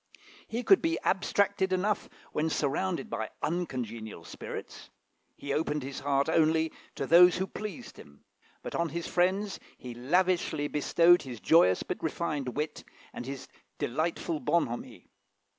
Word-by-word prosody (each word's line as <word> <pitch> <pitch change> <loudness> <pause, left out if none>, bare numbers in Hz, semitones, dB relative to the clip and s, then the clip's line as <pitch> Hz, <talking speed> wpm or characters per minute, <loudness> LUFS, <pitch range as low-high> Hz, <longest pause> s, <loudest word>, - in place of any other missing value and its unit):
He 235 +2 -3
could 390 - +6
be 330 0 +1
abstracted 195 0 +1
enough 195 +3 0 0.2
when 155 +1 0
surrounded 170 +7 -1
by - - -3
uncongenial 115 - -3
spirits; - - -8 0.5
he 140 -1 -4
opened 150 -2 -1
his 135 +1 -5
heart 140 0 +1
only 160 0 +3 0.2
to - - -2
those 175 +3 +7
who 190 - 0
pleased 210 -2 -7
him: 70 0 -15 0.4
but - - -6
on 170 -1 0
his 170 +3 -4
friends 190 +3 +1 0.2
he 125 -1 -8
lavishly 160 +3 +1
bestowed 170 +4 +4
his 125 -5 -8
joyous 95 - +4
but - - -5
refined 150 -5 -2
wit, 150 0 -3 0.3
and 120 - -6
his 135 -1 -6 0.3
delightful 160 +4 -1
bonhomie. 135 -9 -1
160 Hz, 140 wpm, -29 LUFS, 140-180 Hz, 0.5 s, those